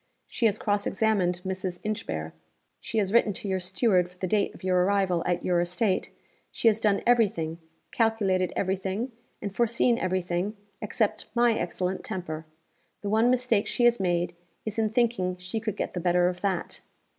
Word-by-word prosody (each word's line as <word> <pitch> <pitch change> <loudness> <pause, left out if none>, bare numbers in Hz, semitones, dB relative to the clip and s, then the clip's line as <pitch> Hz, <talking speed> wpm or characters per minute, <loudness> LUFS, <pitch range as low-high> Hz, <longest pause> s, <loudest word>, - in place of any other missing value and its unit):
She 235 - +1
has 210 -1 0
cross 205 -1 0
examined 190 -4 +1
Mrs. 185 -1 -3
Inchbare; 80 - -3 0.5
she 225 - -4
has 200 -1 +1
written 230 -3 +4
to 200 - -5
your 190 -1 0
steward 185 0 +2
for 180 - -21
the 185 - -2
date 200 +2 +1
of - - -15
your 180 -1 +3
arrival 190 -3 +2
at 175 0 0
your 175 -1 +3
estate; 185 +3 0 0.4
she - - 0
has 215 0 0
done 210 -3 +2
every 240 -2 +5
thing, 165 -4 -5 0.3
calculated 200 -6 +1
every 190 0 0
thing, 195 +7 -3 0.3
and 200 -1 -4
foreseen 235 +1 +2
every 185 0 0
thing 180 +5 -2 0.2
except 215 0 -1
my 240 -1 +4
excellent 185 -3 -2
temper. 160 -6 -5 0.5
The 205 - -3
one 220 +3 +4
mistake 250 -4 +2
she 245 - 0
has 240 -2 +4
made, 175 -2 0 0.3
is 220 0 -3
in 220 -1 +2
thinking 220 -6 +1
she 180 +5 -4
could 215 -2 -4
get - - -2
the 180 - -4
better 175 0 +3
of 180 0 -5
_that. 190 -4 -2
195 Hz, 185 wpm, -27 LUFS, 180-220 Hz, 0.5 s, every